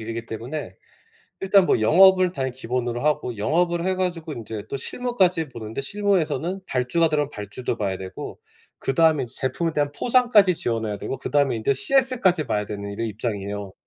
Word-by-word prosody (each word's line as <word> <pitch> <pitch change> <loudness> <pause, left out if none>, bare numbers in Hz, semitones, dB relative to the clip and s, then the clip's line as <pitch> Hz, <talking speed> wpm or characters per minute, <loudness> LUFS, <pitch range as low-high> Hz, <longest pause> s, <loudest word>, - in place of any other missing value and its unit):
일이기 115 +1 -5
때문에 115 - -6 0.7
일단 195 -1 +4
뭐 - - +2
영업을 185 - +6
당연히 130 -5 -2
기본으로 120 -1 -3
하고 145 -5 0
영업을 170 +11 +1
해 190 0 +1
가지고 175 -4 -3
인제 110 -4 -6
또 - - -3
실무까지 185 - 0
보는데 115 -1 -6
실무에서는 185 +1 -1
발주가 130 +4 +1
들어가면 150 -2 0
발주도 105 +2 -5
봐야 100 -4 -2
되고 95 -1 -8 0.4
그다음에 155 0 +2
이제 115 - -12
제품에 160 +6 -1
대한 145 -1 0
포상까지 235 - +4
지원해야 115 -7 -2
되고 135 - -4
그다음에 140 -2 +1
이제 110 +5 +1
CS까지 235 - +2
봐야 105 -3 -1
되는 100 0 -6
이런 115 +3 -3
입장이에요. 105 -2 -4
140 Hz, 430 characters per minute, -23 LUFS, 115-180 Hz, 0.7 s, 영업을